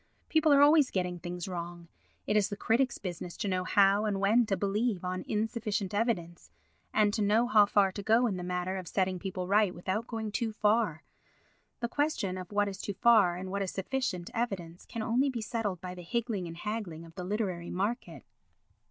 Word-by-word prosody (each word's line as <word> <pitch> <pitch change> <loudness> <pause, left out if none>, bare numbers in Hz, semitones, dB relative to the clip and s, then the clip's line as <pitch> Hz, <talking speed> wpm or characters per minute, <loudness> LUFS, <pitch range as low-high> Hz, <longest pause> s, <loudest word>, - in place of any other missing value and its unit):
People 315 -1 +3
are 285 0 +7
always 295 -2 +6
getting 180 -2 -2
things 175 +1 -5
wrong. 175 -1 -6 0.4
It 210 - 0
is 210 -2 +3
the 205 - -5
critic's 240 +4 +1
business 175 -2 -6
to 210 - -2
know 185 -1 0
how 200 +2 +4
and 200 -2 0
when 220 +4 +3
to 195 - 0
believe 200 0 0
on 185 0 -3
insufficient 215 -2 -2
evidence 195 -6 -2 0.4
and 210 -1 +3
to 215 - -1
know 210 +3 +3
how 210 -3 +5
far 200 -2 +3
to 200 - -6
go 225 +4 +3
in 210 -5 0
the 180 - -5
matter 180 +1 -2
of 185 -2 -6
setting 185 0 0
people 185 -1 -4
right 200 -1 +3
without 195 +6 -3
going 220 -2 -4
too 225 0 -2
far; 210 -7 +1 0.8
the 235 - 0
question 235 -9 -1
of 185 0 -7
what 205 0 +2
is 195 -1 -5
too 205 - -4
far 210 -6 +5
and 185 +1 -6
what 200 0 -2
is 195 - -1
sufficient 195 -3 -3
evidence 185 -7 -4
can 230 - -4
only 250 +5 +2
be 250 -3 -3
settled 215 -4 -2
by 180 -1 -6
the 180 - -9
higgling 210 0 -2
and 165 0 -8
haggling 195 -5 -5
of 165 - -14
the 180 - -6
literary 185 -3 -2
market. 205 +7 -3
200 Hz, 205 wpm, -30 LUFS, 180-225 Hz, 0.8 s, are